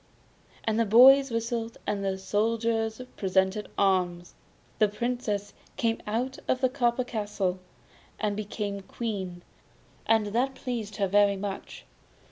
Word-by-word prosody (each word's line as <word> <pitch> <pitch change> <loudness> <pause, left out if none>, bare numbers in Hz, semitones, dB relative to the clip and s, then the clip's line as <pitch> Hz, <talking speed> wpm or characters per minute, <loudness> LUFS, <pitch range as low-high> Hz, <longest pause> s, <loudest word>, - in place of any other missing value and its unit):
And 220 0 0
the 230 - +3
boys 265 +6 +8
whistled 230 0 -2
and 205 -1 -1
the 190 -1 -1
soldiers 225 +3 0 0.2
presented 190 +1 +1
arms. 180 -3 +1 0.5
The 215 - +5
Princess 210 -2 -2 0.2
came 230 -4 0
out 245 +5 -2
of 255 - +1
the 260 -1 +2
copper 250 -1 +1
castle, 205 -6 -2 0.6
and 210 -2 0
became 205 -1 -4
Queen; 190 -5 -5 0.6
and 220 -1 +4
that 265 +3 +1
pleased 235 -5 -4
her 200 -2 +1
very 200 +1 +4
much. 195 0 -6
215 Hz, 125 wpm, -28 LUFS, 200-235 Hz, 0.6 s, boys